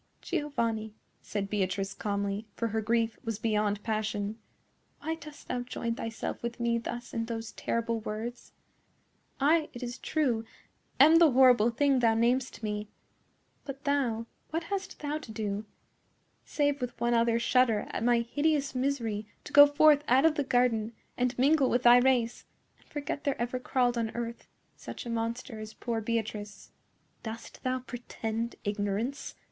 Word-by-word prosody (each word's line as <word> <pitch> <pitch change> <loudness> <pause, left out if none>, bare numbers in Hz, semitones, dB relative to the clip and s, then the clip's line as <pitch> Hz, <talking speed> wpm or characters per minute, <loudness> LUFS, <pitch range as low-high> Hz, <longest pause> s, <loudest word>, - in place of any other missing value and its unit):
"Giovanni," 230 - -2 0.3
said 200 -2 -3
Beatrice, 195 -1 -1
calmly, 200 +1 -2
for 230 - -1
her 220 +1 -1
grief 225 +1 0
was 225 -3 -3
beyond 210 -2 0
passion, 215 -1 -2 0.6
"why 320 +2 -2
dost 300 -2 -11
thou 250 - -2
join 240 -1 -3
thyself 225 -1 -5
with 235 +1 -4
me 235 0 +1
thus 240 +1 -6
in 230 -1 -1
those 225 -1 -5
terrible 230 0 -1
words? 220 +3 -6 0.9
I, 305 +3 +3
it 245 - -7
is 240 0 -5
true, 255 -8 0 0.6
am 310 +4 +8
the 330 -2 +7
horrible 250 -4 +6
thing 275 +2 +2
thou 230 -2 +3
namest 245 +1 +1
me. 210 0 -3 0.8
But 275 0 -8
thou,—what 280 +3 -2
hast 390 +1 -5
thou 295 +1 -2
to 255 - -10
do, 210 -1 -3 0.8
save 290 -2 0
with 245 -1 -4
one 240 0 +1
other 230 0 +3
shudder 235 -2 +3
at - - -3
my 240 0 +4
hideous 285 +3 0
misery 240 -6 -1 0.2
to - - -11
go 290 0 +10
forth 290 0 +5
out 260 +5 +5
of 325 - +5
the 290 - 0
garden 245 -4 +1 0.2
and 250 0 0
mingle 275 +1 +4
with 245 +1 +1
thy 240 0 +9
race, 245 -2 +2 0.4
and - - -27
forget 285 -1 -4
there 280 -2 -1
ever 245 +1 -1
crawled 245 -1 +1
on 225 -1 -1
earth 235 0 -5 0.3
such - - -8
a 235 - -4
monster 230 +1 -3
as 215 0 -8
poor 230 -2 -2
Beatrice?" 210 -2 -4 0.5
"Dost 225 0 -8
thou 255 0 -1
pretend 235 -2 -4
ignorance?" 205 +5 -2
235 Hz, 155 wpm, -29 LUFS, 220-265 Hz, 0.9 s, go